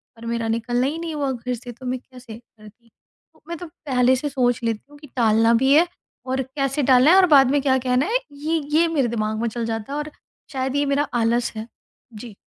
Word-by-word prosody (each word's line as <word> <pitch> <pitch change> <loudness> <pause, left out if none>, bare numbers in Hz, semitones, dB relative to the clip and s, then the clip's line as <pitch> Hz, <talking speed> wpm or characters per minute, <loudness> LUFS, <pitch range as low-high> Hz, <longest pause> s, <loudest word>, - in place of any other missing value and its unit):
पर 230 0 -12
मेरा 230 -1 -2
निकलना 240 +3 0
ही 305 - -3
नहीं 335 -1 -5
हुआ 280 -2 -1
घर 250 0 -4
से, 245 +1 -9
तो 240 +2 -13
मैं 255 0 -2
कैसे 250 -3 -13
करती"। 230 0 -19
तो - - -35
मैं 340 0 -5
तो 350 - -8
पहले 260 -5 +1
से 290 +3 -3
सोच 245 -3 0
लेती 225 -2 -2
हूँ 290 - -14
कि 295 - -13
टालना 225 -1 +3
भी 270 +1 +4
है, 330 +4 +5 0.4
और 260 +1 -1
कैसे 275 +2 -2
टालना 255 +3 +6
है, - - +7
और 380 - +7
बाद 270 -2 +6
में 285 0 +2
क्या 265 -1 +2
कहना 250 +3 +2
है, 465 +6 +1
ये 310 +3 -2 0.2
ये 335 - +4
मेरे 290 -6 0
दिमाग 220 -1 -2
में 235 - 0
चल 235 +1 -4
जाता 225 +3 -4
है। - - -2
और 300 +1 -5 0.4
शायद 265 -1 -2
ये 285 0 +1
मेरा 280 +1 0
आलस 235 +1 +1
है। 220 +1 -6 0.5
जी। 220 0 -10
255 Hz, 235 wpm, -22 LUFS, 230-285 Hz, 0.5 s, है